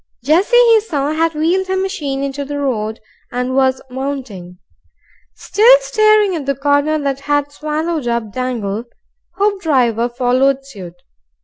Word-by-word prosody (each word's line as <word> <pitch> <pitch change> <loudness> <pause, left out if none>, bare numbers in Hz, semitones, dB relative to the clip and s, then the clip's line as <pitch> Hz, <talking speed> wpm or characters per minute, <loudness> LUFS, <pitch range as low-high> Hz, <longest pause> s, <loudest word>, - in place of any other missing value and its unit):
Jessie, 360 - +3
he 465 -2 +6
saw, 295 -9 -2
had 325 +1 0
wheeled 350 +5 0
her 380 0 -1
machine 305 -9 -3
into 280 +1 -3
the 290 +1 -5
road 220 -6 -2 0.3
and 250 +1 -2
was 265 -1 +1
mounting. 250 -10 -6 0.8
Still 475 +4 +5
staring 430 -4 +3
at 290 -4 -5
the 275 - 0
corner 285 +3 +1
that 275 -2 -2
had 290 0 -1
swallowed 305 -1 -3
up 235 -3 -2
Dangle, 235 -4 -3 0.5
Hoopdriver 280 - +1
followed 260 +2 +1
suit. 190 -10 -10
280 Hz, 135 wpm, -17 LUFS, 250-330 Hz, 0.8 s, he